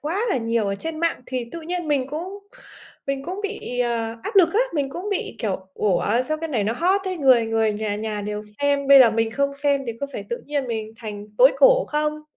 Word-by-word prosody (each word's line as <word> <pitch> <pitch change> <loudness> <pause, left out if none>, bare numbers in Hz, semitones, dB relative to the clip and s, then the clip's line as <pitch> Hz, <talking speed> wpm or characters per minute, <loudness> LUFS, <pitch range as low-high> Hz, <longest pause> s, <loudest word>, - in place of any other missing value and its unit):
quá 335 +8 -2
là - - +2
nhiều 230 -2 0
ở 200 - -1
trên 315 +9 -5
mạng 335 -5 0
thì 255 -2 -3
tự 335 - -6
nhiên 345 0 -4
mình 275 -3 +1
cũng 350 +7 -5 0.7
mình 275 -1 -2
cũng 370 +4 -5
bị, 410 - -5
ờ, 230 -2 -1
áp - - -4
lực 360 -4 +7
á, 430 - +3
mình 285 -3 0
cũng 360 +7 -5
bị, 400 - -3
kiểu, 190 -4 -3
"Ủa, 210 +4 +1
sao 310 +4 -3
cái 325 0 -4
này 230 -8 0
nó 215 - 0
hot 365 +10 +2
thế, 370 -1 -2
người 260 -7 +4
người 225 -1 +1
nhà 210 0 -2
nhà 215 -1 -3
đều 210 +1 -4 0.2
xem, 285 -1 +1
bây 275 0 +9
giờ 245 -3 +7
mình 225 0 0
không 280 +3 -1
xem 280 0 +1
thì 230 - -2
có 280 - -1
phải - - -6
tự 475 +1 -3
nhiên 285 -2 -2
mình 220 -1 -4
thành 210 -2 -7
tối 260 +3 +7
cổ - - +6
không?" 300 0 -1
275 Hz, 245 wpm, -23 LUFS, 225-320 Hz, 0.7 s, bây